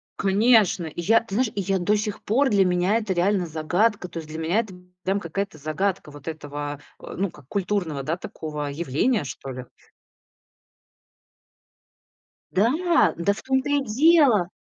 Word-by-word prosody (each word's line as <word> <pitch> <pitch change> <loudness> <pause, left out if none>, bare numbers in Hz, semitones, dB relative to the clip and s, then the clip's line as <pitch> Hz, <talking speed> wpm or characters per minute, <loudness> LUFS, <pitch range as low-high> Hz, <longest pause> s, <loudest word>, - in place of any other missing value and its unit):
Конечно. 200 -3 +3
И 160 +2 -6
я, 225 +6 +4
ты 205 -4 -7
знаешь, 240 -2 +1
и 200 - -2
я 195 +1 0
до 205 +5 +2
сих 210 0 -3
пор 265 +6 +2
для 200 -3 +4
меня 180 +4 +2
это 215 -4 -2
реально 185 +1 +1
загадка. 180 +6 0
То 175 - -9
есть 160 - -6
для 160 +1 -6
меня 170 +7 +1
это 215 -5 -4 0.3
прям 195 +2 0
какая-то 195 -1 -4
загадка 155 +3 -2
вот 145 0 -13
этого, 145 -2 -5 0.2
ну 195 +1 -3
как- 150 -5 -16
культурного, 180 -7 -1
да, 165 +5 -2
такого, 150 -4 -6
явления, 160 - 0
что 135 0 -7
ли. 125 0 -7 2.9
Да, 315 - +3
да 185 +4 +1
в 200 - -10
том-то 265 +1 0
и 285 -1 +2
дело. 260 - +4
190 Hz, 160 wpm, -24 LUFS, 160-215 Hz, 2.9 s, я